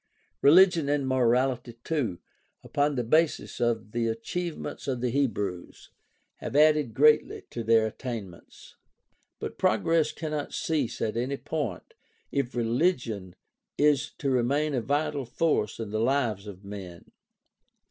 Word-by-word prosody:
Religion 170 0 +6
and 145 -2 +1
morality 125 -1 +1
too, 135 - -1 0.5
upon 145 0 0
the 125 - 0
basis 155 +7 +1
of 115 -3 0
the 115 0 0
achievements 150 +12 -4
of 130 -3 -1
the 125 0 -1
Hebrews, 105 -9 -2 0.5
have 125 - -6
added 150 -6 +4
greatly 150 +3 +4
to 115 - -4
their 110 0 +4
attainments. 110 -6 -8 0.6
But - - -7
progress 155 +9 +2
cannot 155 -2 -4
cease 150 -7 -1
at 110 - -1
any 130 +4 -1
point 135 - -4 0.4
if 135 -3 -2
religion 115 - 0 0.4
is 145 -1 +3
to 140 - -1
remain 140 +5 +1
a 125 - 0
vital 145 +3 -1
force 120 -3 0
in 110 -3 -5
the 110 +1 -1
lives 115 -5 0
of 100 -1 -10
men. 95 -4 -9
125 Hz, 130 wpm, -27 LUFS, 115-150 Hz, 0.6 s, Religion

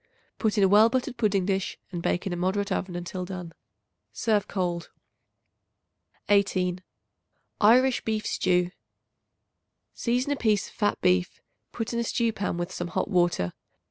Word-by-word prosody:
Put 220 -1 +1
in 200 - +4
a - - +6
well 210 +4 +6
buttered 255 +1 -2
pudding 205 -5 +1
dish 195 -1 -1
and 175 -2 -4
bake 175 +3 -1
in 190 - -2
a - - -1
moderate 190 +3 -1
oven 185 -2 -2
until 175 +1 -4
done. 180 -2 -7 0.6
Serve 215 -3 0
cold. 175 -3 -2 1.4
18. 185 -3 +2 0.8
Irish 250 +4 +5
Beef 220 -1 -2
Stew. 180 -1 +1 1.2
Season 250 +4 0
a - - +2
piece 215 -5 +1
of - - -20
fat 205 -1 0
beef; 90 0 +2 0.3
put 230 0 -4
in 235 - 0
a - - +1
stew 230 0 0
pan 200 -4 -2
with 175 +1 -3
some 175 -1 -4
hot 175 - -2
water. 175 - +1
195 Hz, 155 wpm, -27 LUFS, 180-220 Hz, 1.4 s, a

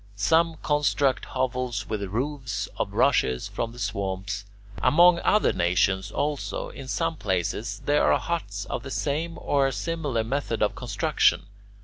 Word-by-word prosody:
Some 160 +11 +2
construct 145 -2 +1
hovels 125 -4 -2
with 110 -2 -3
roofs 130 +5 -3
of - - -2
rushes 65 -1 +2
from 115 - -3
the 120 - -13
swamps. 100 -1 -3 0.4
Among 175 +2 +6
other 210 - +3
nations, 95 +2 +1
also, 145 +5 -2
in 135 - -9
some 165 +3 -1
places 100 +2 -2
there 145 0 +3
are - - +5
huts 100 -13 -3
of - - -4
the 135 - -8
same 155 +5 -2
or 140 -1 +2
a - - -1
similar 145 -5 -2
method 115 -2 -1
of 105 - +1
construction. - - +1
125 Hz, 145 wpm, -26 LUFS, 100-150 Hz, 0.4 s, Among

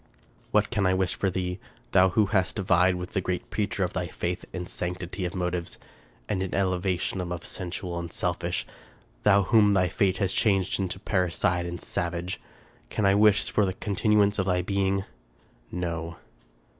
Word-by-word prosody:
" - - -33 0.2
What - - +2
can 100 -2 +2
I 95 - +3
wish 95 -1 +1
for 95 - 0
thee? 90 0 -3 0.3
Thou 95 0 +6
who 105 +3 +3
hast 95 +1 +2
vied 95 -2 +3
with 90 0 -6
the 95 - +1
great 90 0 -3
Preacher 105 -2 -1
of 90 - -2
thy 90 -1 -2
faith 85 +2 -3
in 90 -1 -4
sanctity 90 +1 -4
of 90 +3 -4
motives, 90 -1 -2 0.5
and 95 -3 -1
in 95 - -2
elevation 95 -1 0
above 90 -1 -5
sensual 90 -1 -4
and 85 0 -6
selfish! 90 0 -1 0.6
Thou 100 -1 +5
whom 105 +1 +5
thy 90 -2 +3
fate 95 +2 +1
has 95 -2 +1
changed 95 -5 +2
into 95 -1 -2
parricide 90 -2 0
and 85 0 -5
savage! 85 +1 -3 0.5
Can 105 - -1
I 95 - +5
wish 105 0 +4
for 105 - +3
the 95 -2 0
continuance 105 +1 +2
of 95 - 0
thy 90 -1 +1
being? 100 0 0 0.7
No." 85 -1 -3
95 Hz, 175 wpm, -27 LUFS, 90-100 Hz, 0.7 s, Thou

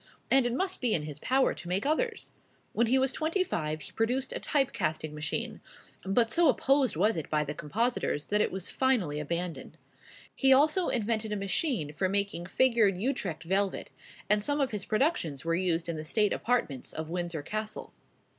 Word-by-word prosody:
and 265 -2 +5
it 240 - -2
must 375 +4 -2
be 240 -4 +2
in 150 - -1
his 150 -1 -6
power 265 - +2
to 175 - -9
make 185 +6 -1
others. 445 - -1 0.4
When 235 +1 +2
he 260 +4 +4
was 265 0 +2
twenty 325 +6 0
five 155 - -3
he 135 - -9
produced 250 +4 -1
a - - -3
type 275 -4 +1
casting 155 0 -2
machine; 150 0 -3 0.4
but 220 +4 +2
so 340 -3 +5
opposed 270 - +2
was 210 +7 +2
it 160 - -4
by 150 -1 +1
the 150 0 -4
compositors, 170 - -1
that 210 +5 +1
it - - +1
was 190 -1 -4
finally 215 - +1
abandoned. 170 +3 -4 0.6
He 270 -1 +3
also 305 +7 +4
invented 220 -2 -1
a - - 0
machine 200 - -1
for 185 +4 0
making 200 -3 -1
figured 225 -4 +3
Utrecht 195 - -2
velvet; 190 +3 -1 0.4
and 210 0 +2
some 290 +4 0
of 270 -3 +1
his 205 -3 -4
productions 215 - 0
were 165 - +1
used 170 -1 0
in 170 -2 -3
the 155 - -5
state 210 +6 +2
apartments 225 - -1
of 160 0 -5
Windsor 175 -3 -3
Castle. 215 +5 -5
210 Hz, 190 wpm, -29 LUFS, 165-260 Hz, 0.6 s, and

